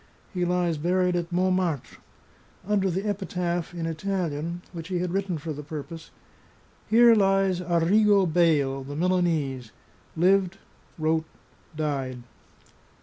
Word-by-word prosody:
He 180 -1 0
lies 175 -3 0
buried 180 +2 +1
at 170 0 -2
Montmartre, 180 -5 0 0.7
under 200 -2 +2
the 190 +4 -2
epitaph, 180 -4 -2
in 165 -1 -3
Italian, 170 -1 -3
which 165 -2 -7
he 185 -1 -2
had 175 0 -2
written 190 -3 -1
for 155 +1 -5
the 150 - -7
purpose: 155 +2 -8 0.8
"Here 235 +1 +6
lies 195 -3 +2
Arrigo 190 +4 +3
Beyle, 155 -6 +2
the 140 +2 -7
Milanese. 155 -8 0 0.5
Lived, 190 +2 +3 0.4
Wrote, 160 0 0 0.5
Died." 135 -5 -3
175 Hz, 120 wpm, -26 LUFS, 155-185 Hz, 0.8 s, Here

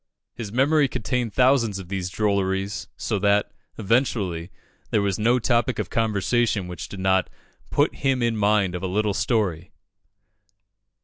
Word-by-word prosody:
His 110 -4 -7
memory 140 +4 +3
contained 120 -1 -2
thousands 125 -4 +3
of 95 -3 -8
these 95 -2 -3
drolleries; 100 -1 -1
so 105 -4 -2
that, 100 +1 +2 0.3
eventually, 100 -6 0 0.4
there 105 - +1
was 100 -1 -1
no 120 +4 +3
topic 120 0 +1
of - - -4
conversation 110 -1 +1
which 90 -1 -7
did 100 - -8
not 95 0 +2 0.4
"put - - +1
him 135 -3 +1
in 115 -1 +1
mind 105 -3 +2
of 90 - -4
a 95 - -2
little 105 +2 0
story." 95 - -1
105 Hz, 145 wpm, -24 LUFS, 95-120 Hz, 0.4 s, memory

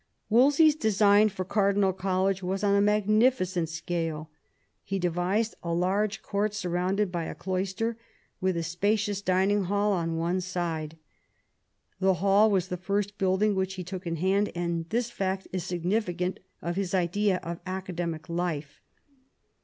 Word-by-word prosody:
Wolsey's 285 +7 +5
design 210 -3 +4
for 185 -2 -5
Cardinal 200 -1 +2
College 190 +1 0
was 190 +2 -2
on 200 -1 +3
a 200 - +4
mag 210 0 +2
nificent 215 -6 +2
scale. 165 -1 -4 0.5
He 195 - -2
devised 180 +5 0
a 170 -1 -2
large 195 +4 0
court 205 +1 -1
surrounded 185 +1 0
by 170 -2 -2
a - - -6
cloister, 195 +5 -2 0.4
with 185 -2 0
a 165 - -1
spacious 200 +4 0
dining 190 +1 +2
hall 205 +2 +1
on 165 -3 -1
one 175 +3 0
side. 165 -3 -3 1.0
The 190 0 +3
hall 200 +4 +4
was 190 -3 +1
the 180 - -3
first 200 +3 -2
building 195 +2 +2
which 190 0 -1
he 185 - -5
took 185 0 -6
in 165 - -1
hand, 195 +5 +1
and 170 -1 -2
this 235 +1 -1
fact 190 -2 -2
is 185 -2 -3
significant 180 0 -1 0.2
of 170 +1 -2
his 195 -1 -1
idea 185 +2 +1
of 170 +1 -5
academic 175 -4 -4
life. 170 -4 -3
190 Hz, 155 wpm, -28 LUFS, 175-205 Hz, 1.0 s, Wolsey's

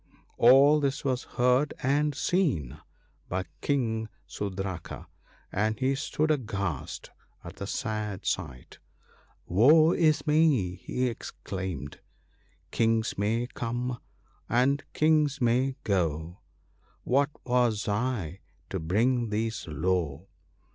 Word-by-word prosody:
" - - -36
All 140 +4 +7
this 140 -1 -1
was 130 -2 -1
heard 125 +3 +1
and 145 +2 +1
seen 120 - 0 0.5
by 95 +1 -2 0.2
King 110 -6 0 0.2
Sudraka, 95 -4 -5 0.5
and 110 +2 0
he 130 +1 +1
stood 155 +3 -1
aghast 100 - -3 0.3
at 85 +3 -10
the 100 - -5
sad 105 -4 -3
sight. 70 -9 -4 0.4
' - - -30 0.3
Woe 150 - +6
is 155 -4 +2
me! 150 - +3
' - - -20
he 125 - -2
exclaimed, 95 -8 -6 0.2
— - - -38
" - - -38
Kings 115 0 +1
may 110 +4 0
come, 120 +1 -3 0.5
and 130 +4 +2
Kings 155 -2 +2
may 130 +2 +2
go; 85 -3 -1 0.6
What 140 +3 +2 0.2
was 120 -4 +1
I, 105 -5 -2 0.3
to - - -2
bring 115 +8 +1
these 110 0 -2
low 80 0 -1
115 Hz, 120 wpm, -28 LUFS, 95-135 Hz, 0.6 s, All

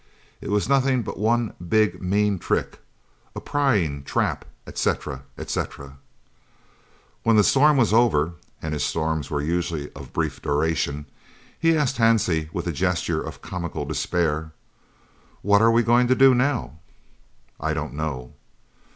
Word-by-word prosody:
It - - -6
was 105 -2 +1
nothing 135 -2 +2
but - - -6
one 115 +1 +1 0.2
big 105 -5 +2
mean 100 +1 +1
trick, - - -2 0.6
a - - -4
prying 100 - 0
trap," - - -1 0.2
etc., 65 -3 -2 0.2
etc. 70 0 -5 1.2
When 115 0 +3
the 105 - +6
storm 145 +6 +4
was 115 -5 +3
over 85 -9 +3 0.3
(and 80 -1 -3
his 75 - -1
storms 80 -3 -1
were 75 -1 -2
usually 85 -2 -2
of - - -11
brief - - -2
duration) 75 -1 -1 0.5
he 165 -1 +3
asked 140 -3 0
Hansie, 100 -9 +2
with 85 - -4
a 85 - -1
gesture 90 +2 -1
of - - -8
comical 85 -3 -4
despair: 80 -3 -1 0.9
"What 100 +1 +4
are 115 - +6
we 115 +1 +4
going 120 +2 +4
to 130 - +3
do 135 0 +6
now?" 125 - 0 0.8
"I 80 0 -1
don't 75 -1 -4
know." 70 -5 -4
90 Hz, 140 wpm, -24 LUFS, 75-115 Hz, 1.2 s, the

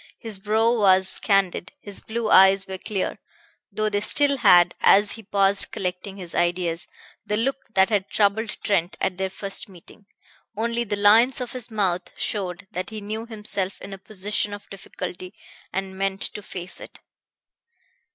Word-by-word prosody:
His 220 -4 -6
brow 220 +3 +2
was 190 -2 +4
candid, 195 -4 +1
his 205 -1 -8
blue 225 0 -3
eyes 195 0 +7
were 190 -1 -7
clear, 195 -1 -3 0.5
though 215 0 -1
they 205 -1 0
still 280 +6 +2
had, 175 -7 +6
as 205 +1 +5
he 225 - -8
paused 200 -1 +2
collecting 185 +1 -4
his 180 -3 -8
ideas, 175 -1 0 0.4
the 210 - -2
look 265 +5 0 0.2
that 190 +1 +5
had 200 -2 +1
troubled 215 +1 +1
Trent 185 -3 0
at 185 0 -1
their 190 0 -1
first 195 +3 -5
meeting. 195 +3 -16 0.5
Only 235 +1 0
the 205 - -2
lines 220 +6 +5
of 245 -2 -5
his 250 -2 -6
mouth 195 -5 -1
showed 185 -3 -3
that 185 +1 -4
he 220 -1 -6
knew 215 +3 -5
himself 210 -4 -4
in 195 - -9
a 195 - -8
position 205 +1 -2
of 205 - -14
difficulty, 180 -1 -7 0.4
and 190 0 -4
meant 195 0 -2
to 210 - -2
face 185 -2 -8
it. - - -11
200 Hz, 165 wpm, -24 LUFS, 190-215 Hz, 0.5 s, eyes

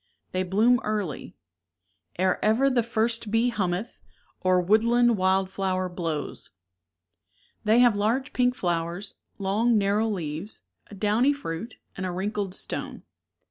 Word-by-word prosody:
They 185 - -1
bloom 215 +7 +3
early, 205 -8 -3 0.8
Ere 185 +1 +1
ever 245 +6 +3
the 250 -2 +3
first 230 -1 -1
bee 225 +3 +2
hummeth, 200 0 -2 0.4
Or 185 0 +3
woodland 230 +5 +3
wild 190 0 +1
flower 185 -1 -1
blows. 165 -4 -4 1.2
They 220 +3 +5
have 240 -4 +5
large 225 +6 0
pink 250 0 +2
flowers, 175 +1 -2 0.2
long 215 +4 +2
narrow 205 +2 +2
leaves, 175 -1 -4 0.3
a 205 - -11
downy 215 +8 +2
V - - -9
fruit, 225 -2 -6 0.2
and 185 0 -3
a - - -3
wrinkled 195 +1 -3
stone. - - -4
205 Hz, 135 wpm, -26 LUFS, 185-230 Hz, 1.2 s, They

